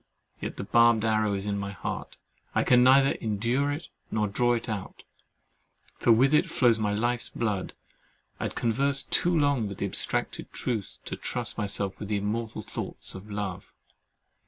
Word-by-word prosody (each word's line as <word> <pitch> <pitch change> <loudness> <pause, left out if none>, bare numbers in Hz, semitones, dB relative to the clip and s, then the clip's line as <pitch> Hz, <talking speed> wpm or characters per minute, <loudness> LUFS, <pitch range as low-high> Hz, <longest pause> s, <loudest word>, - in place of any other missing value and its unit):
Yet - - -5
the - - -4
barbed 115 +1 +4
arrow 110 -2 +2
is 100 0 -4
in 100 -1 -1
my 100 0 -3
heart—I - - -5
can 125 -1 +5
neither 135 +2 +6
endure 120 +6 0
it, 150 +4 -5 0.2
nor 105 -1 0
draw 120 +4 +2
it 120 +1 -4
out; 105 -4 -5 1.0
for - - +4
with 130 +6 +5
it 150 - +4
flows 120 -4 +3
my 105 -1 0
life's 120 +3 -1
blood. 105 -5 -2 0.7
I - - -2
had - - -4
conversed 135 +4 0
too 175 -1 +3
long 140 -7 +2
with 100 - -8
abstracted - - -2
truth 110 -6 -3
to - - -4
trust - - -1
myself 100 -1 -2
with 105 - -6
the 105 - +1
immortal 110 +2 -3
thoughts - - -1
of 95 +3 -10
love. 100 -3 -5
110 Hz, 165 wpm, -27 LUFS, 105-125 Hz, 1.0 s, neither